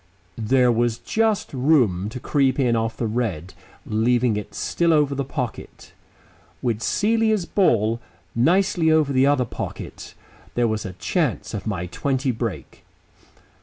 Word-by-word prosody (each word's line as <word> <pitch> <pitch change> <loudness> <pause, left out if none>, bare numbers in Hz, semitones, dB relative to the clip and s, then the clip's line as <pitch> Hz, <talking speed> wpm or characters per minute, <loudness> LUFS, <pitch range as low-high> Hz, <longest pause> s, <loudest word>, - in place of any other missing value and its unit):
There 125 +3 +3
was 120 0 +1
just 220 - 0
room 125 - +2
to 125 - -7
creep 135 0 +1
in 125 -3 +2
off 115 0 -1
the 120 - -2
red, 105 -7 -2 0.3
leaving 120 +1 +2
it 105 - -6
still 170 -1 +1
over 150 -2 +3
the 140 0 -2
pocket. 125 -3 -6 0.7
With 115 -3 -1
Celia's 220 - +1
ball 115 - +2 0.3
nicely 170 +5 +2
over 155 -3 +3
the 130 +1 +4
other 140 -3 +2
pocket - - -7 0.4
there 120 -1 +2
was 110 -1 -2
a 95 - -7
chance 90 - -1
of - - -5
my 90 - -2
twenty 130 +7 -1
break. 110 - -5
125 Hz, 140 wpm, -23 LUFS, 115-150 Hz, 0.7 s, the